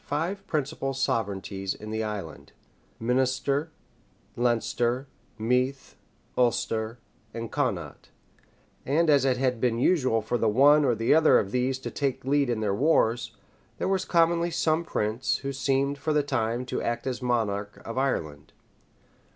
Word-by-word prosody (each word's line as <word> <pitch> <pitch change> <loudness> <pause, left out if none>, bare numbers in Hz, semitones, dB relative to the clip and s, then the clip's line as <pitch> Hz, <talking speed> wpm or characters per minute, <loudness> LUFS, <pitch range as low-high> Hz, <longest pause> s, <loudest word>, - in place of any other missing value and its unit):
five 175 +7 -2
principal 140 -2 -2
sovereignties 100 -5 -2
in 105 0 -9
the 110 0 -1
island, 100 -7 -6 0.5
Minister, 130 +5 0 0.7
Leinster 120 +1 0 0.3
Meath, 125 +4 -1 0.4
Ulster, 115 -2 0 0.4
and 115 -1 -5
Connaught; 110 - -3 0.7
and 155 +4 +2
as 140 -2 +4
it 130 -2 +2
had 125 -3 0
been 120 -2 +1
usual 130 - +2
for 120 +2 -1
the 115 - +2
one 145 +7 +5
or 120 - +2
the 115 +4 +2
other 160 0 +6
of 100 - -1
these 125 +2 0
to 130 - -6
take 140 -3 -2
the 135 - -3
lead 140 -2 +3
in 115 -2 -1
their 105 -2 0
wars, 120 -2 +1 0.4
there - - -2
was 190 -1 +1
commonly 170 0 +2
some 165 -1 +1
prince, 110 -6 -1
who 140 0 -3
seemed, 135 +1 0
for 155 - -1
the 150 -1 +2
time, 120 -3 -1
to - - -3
act 120 0 -2
as 130 -2 -3
monarch 105 -4 -1
of 115 - -5
Ireland. 80 - -2
125 Hz, 150 wpm, -27 LUFS, 115-140 Hz, 0.7 s, other